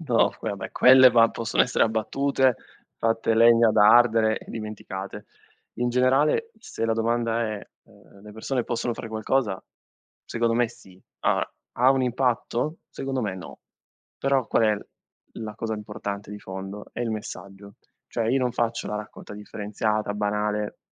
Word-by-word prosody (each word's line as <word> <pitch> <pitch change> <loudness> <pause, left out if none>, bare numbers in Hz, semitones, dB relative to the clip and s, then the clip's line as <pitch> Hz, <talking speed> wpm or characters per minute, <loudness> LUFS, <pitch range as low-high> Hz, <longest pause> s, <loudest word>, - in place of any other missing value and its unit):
no, 125 -8 +2
poi 110 - -3
vabbè, 100 - -4
va - - -6
quelle 130 0 +7 0.2
possono 115 -1 +1
essere 125 - +2
abbattute, 130 +4 +1 0.4
fatte 115 0 +1
legna 115 0 +6
da 105 0 +5
ardere 115 -1 +5
e - - -13
dimenticate. 105 -3 -7 0.5
In 120 +1 -1
generale, 135 - +2
se 115 - -5
la 115 - +1
domanda 115 +1 0
è: 110 -2 -4 0.2
ehm, 100 - -20
le 105 - -11
persone 120 +3 -2
possono 120 0 -2
fare 115 - -7
qualcosa? 110 -2 -1 0.6
Secondo 115 -1 0
me 120 0 +2
sì. 95 -5 -17 0.2
Allora, - - +1 0.2
ha 125 +2 +4
un 135 -1 +2
impatto? 125 +4 -1
Secondo 135 -1 -4
me 100 -3 -2
no. 90 - -10 0.6
Però 135 -3 +1
qual - - +2
è 105 -1 +2 0.6
la 110 -2 -6
cosa 110 0 -3
importante 105 -1 -6
di 105 - -7
fondo? 95 +1 -8
È - - -6
il 120 -2 -1
messaggio. 100 -1 -8 0.3
Cioè, 115 - -2
io 130 +4 +2
non 125 -1 0
faccio 115 -1 -1
la 105 - -3
raccolta 105 0 -9
differenziata 105 0 -3
banale, 105 0 -2
115 Hz, 160 wpm, -25 LUFS, 105-120 Hz, 0.6 s, quelle